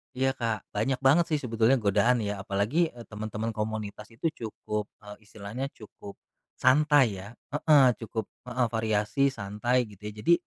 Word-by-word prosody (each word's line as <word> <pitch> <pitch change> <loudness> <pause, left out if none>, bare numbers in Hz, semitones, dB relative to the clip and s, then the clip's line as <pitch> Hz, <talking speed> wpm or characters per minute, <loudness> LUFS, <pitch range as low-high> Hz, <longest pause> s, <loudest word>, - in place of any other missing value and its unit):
Iya, 135 +1 +2
Kak, 115 -3 -2
banyak 125 +5 -1
banget, 145 +6 +5
sih, 155 -3 0
sebetulnya 115 0 +2
godaan 115 +4 +3
ya. 105 -1 -2
Apalagi, 110 - +1
eee, 120 - -11
teman-teman 110 +1 -4
komunitas 105 -1 -4
itu 160 +8 -1 0.2
cukup, 105 -1 -4 0.2
eee, 105 +1 -12
istilahnya 110 +5 -6
cukup, 100 -2 -12 0.4
santai 135 -5 +4
ya 95 +2 -8 0.2
heeh, 145 -2 +5
cukup 110 -2 -5 0.2
heeh, 125 -1 0
variasi, 110 +4 +1
santai, 115 +3 -1
gitu 105 0 -14
ya. 105 - -5
Jadi, 170 - +5
110 Hz, 155 wpm, -28 LUFS, 105-130 Hz, 0.4 s, banget